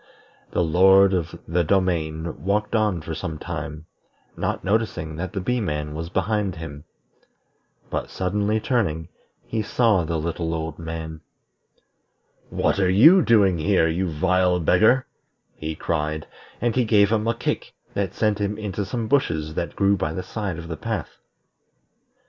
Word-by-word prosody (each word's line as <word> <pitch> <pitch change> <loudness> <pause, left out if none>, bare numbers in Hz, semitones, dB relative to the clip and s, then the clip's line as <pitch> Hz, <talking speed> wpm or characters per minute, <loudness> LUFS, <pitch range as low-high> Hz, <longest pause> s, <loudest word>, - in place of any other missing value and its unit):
The 90 - +1
Lord 95 +4 +5
of 85 -4 -2
the 85 +2 +1
Domain 80 -4 -1
walked 105 +3 0
on 105 -6 +1
for 80 +1 -5
some 80 0 -4
time, 75 +1 -6 0.5
not - - -2
noticing 95 -6 -1
that 90 +2 -4
the 100 - -2
Bee 125 +6 -1
man 75 -5 -3
was 80 +2 -5
behind 100 +1 0
him. 75 -2 -8 1.1
But - - -3
suddenly 100 +3 0
turning, 90 - -1 0.4
he 110 - -2
saw 110 -3 +2
the 80 +1 -2
little 80 +1 -2
old 80 0 -4
man. 80 -1 -6 1.3
"What - - 0
are 95 -2 +3
you 155 - +7
doing 100 - +4
here, 85 0 +3
you 85 +3 -1
vile 90 +3 +2
beggar?" 110 +10 +4 0.5
he 80 0 -5
cried; 75 -1 -2 0.3
and 120 -1 0
he 125 - +3
gave 105 -2 +4
him 110 0 +1
a 115 - +1
kick - - -3 0.2
that 100 -2 -2
sent 105 -2 +1
him 100 +1 -1
into 105 -2 -3
some 115 +2 -3
bushes 80 - +1
that 85 -1 -3
grew 100 0 +3
by 80 -5 -2
the 90 - -4
side 100 -6 -4
of 85 -1 -7
the 80 -1 -5
path. - - -4
90 Hz, 155 wpm, -23 LUFS, 80-105 Hz, 1.3 s, you